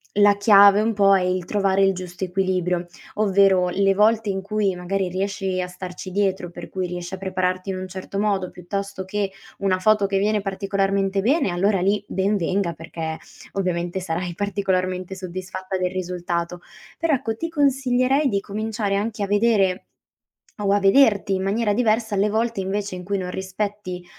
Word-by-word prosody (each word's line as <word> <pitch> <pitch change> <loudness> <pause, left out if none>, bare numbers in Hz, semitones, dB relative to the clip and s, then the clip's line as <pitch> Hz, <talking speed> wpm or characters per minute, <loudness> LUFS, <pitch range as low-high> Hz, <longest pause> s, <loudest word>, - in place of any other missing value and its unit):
la 205 0 +5
chiave 200 0 +7
un 225 - +1
po' 195 -1 +5
è 190 - +2
il 180 0 -1
trovare 195 0 +1
il 195 0 +4
giusto 180 0 -5
equilibrio, 180 -1 0 0.3
ovvero 195 -3 +3
le 195 +2 +2
volte 215 +2 +3
in 195 -1 -1
cui 200 -1 0
magari 185 +2 -2
riesci 190 0 -2
a 180 - -3
starci 180 +1 -8
dietro, 190 -2 0
per 175 0 -9
cui 185 -1 -3
riesci 175 +1 -6
a 190 - -3
prepararti 185 0 -2
in 190 - -2
un 185 0 -5
certo 190 +1 -6
modo, 200 -3 0
piuttosto 190 +2 -5
che, 200 0 -2 0.3
una 190 -2 +1
foto 210 +1 +3
che 195 0 0
viene 210 +1 +1
particolarmente 195 0 0
bene, 270 - +2
allora 195 +3 +1
lì 200 +3 +1
ben 195 +2 +1
venga 185 -1 0
perché 160 0 -6 0.4
ovviamente 180 -1 -2
sarai 175 0 -3
particolarmente 185 -2 -1
soddisfatta 185 +1 -5
del 180 -1 -1
risultato. 175 -1 -3 0.4
Però 330 -2 +1
ecco, 225 -4 -1
ti 330 - -3
consiglierei 270 -2 +2
di 200 -6 0
cominciare 210 0 -2
anche 210 0 -2
a - - -1
vedere, 205 -3 +2 0.8
o 200 - +2
a 205 - +3
vederti 200 -1 +4
in 190 - -2
maniera 210 +2 +1
diversa, 220 -1 +1
alle 200 +1 +2
volte 225 -1 0
invece 195 +1 -3
in 180 0 -7
cui 200 +2 -1
non 180 -1 -4
rispetti, 190 -1 -4
195 Hz, 175 wpm, -23 LUFS, 185-205 Hz, 0.8 s, chiave